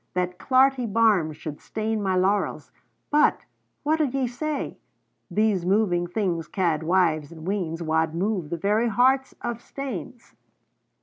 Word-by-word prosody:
That 180 0 -1
clarty 260 -3 +3
barm 210 -8 +3
should 150 -1 -8
stain 220 0 -2
my 190 -2 0
laurels: 195 +3 0 0.4
But 300 +1 +4 0.4
what'll 310 0 +2
ye 265 0 -1
say 280 +4 -4 0.5
These 210 -4 +1
movin' 180 -2 +2
things 175 -4 -1
ca'd 170 -6 0
wives 160 -3 +1
and 160 -1 -10
weans 175 -4 -2
Wad 160 0 0
move 185 -3 -1
the 170 - -2
very 210 +7 +1
hearts 260 +4 +2
o' 240 - -1
stanes!" 245 - -7
200 Hz, 135 wpm, -25 LUFS, 170-240 Hz, 0.5 s, But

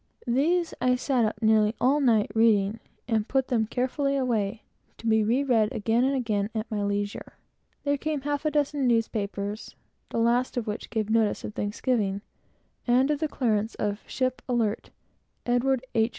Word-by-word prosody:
These 320 +8 +1
I 250 0 +3
sat 250 -2 +1
up 215 +1 -3
nearly 220 0 +4
all 270 +4 +3
the 275 - +2
night 220 -3 +3
to 220 - -1
read, 215 -1 +3 0.3
and 220 -3 0
put 265 -1 0
them 225 -4 +1
carefully 275 +4 -1
away, 225 -5 -1 0.3
to - - -13
be 220 -1 +3
read 235 +6 +2
and - - -7
re 245 - +4
read 215 -1 +2
again 225 +3 +1
and 270 +1 +2
again 215 -5 -1
at 220 +2 -3
my 210 -1 -1
leisure. 205 0 -3 0.5
Then 285 -1 0
came 305 -1 -2
a - - -21
half 290 0 -2
a 305 - +2
dozen 290 -2 0
newspapers, 210 -3 -2 0.3
the - - -4
last 240 +3 +1
of 240 - -1
which 210 0 -5
gave 220 -2 -2
notice 225 -2 +2
of 210 - -6
Thanksgiving, 205 -1 -1 0.7
and 255 +4 +4
of 295 - 0
the 315 - 0
clearance 225 -6 -1
of 205 +1 -3
"ship 255 -1 -1
Alert, 230 -4 0 0.6
Edward 250 +1 +1
H. 225 -1 +2
235 Hz, 190 wpm, -26 LUFS, 215-260 Hz, 0.7 s, nearly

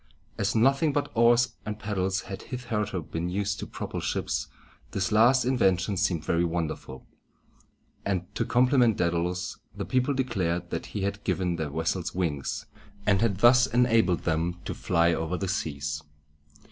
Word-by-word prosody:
As 100 +4 -1
nothing 135 +6 +3
but 145 0 -1
oars 120 +1 +4
and 105 -1 -4
paddles 95 -3 -1
had 95 -1 -7
hitherto 105 - -3
been 80 +3 -4
used 100 +1 -1
to - - -5
propel - - -5
ships, - - -2 0.5
this 95 +1 -1
last 120 +4 +5
invention 100 -6 +2
seemed 90 -4 0
very 85 +1 +2
wonderful; 80 -6 -3 1.0
and, 95 -3 -1
to - - 0
compliment 125 -3 +3
Dædalus, 85 +1 -1 0.2
the - - -3
people 130 +2 +1
declared 90 -9 -1
that 85 - -3
he 100 - -4
had 100 +1 -3
given 90 -3 0
their 80 -2 -2
vessels 80 +5 -2
wings, 80 - -2 0.4
and 100 -1 +3
had 110 -5 +1
thus 120 +1 +7
enabled 115 -8 +3
them 85 +2 -1
to - - -3
fly 85 +1 +2
over 80 +2 -2
the 95 - -3
seas. 75 -5 -2
95 Hz, 155 wpm, -27 LUFS, 85-115 Hz, 1.0 s, thus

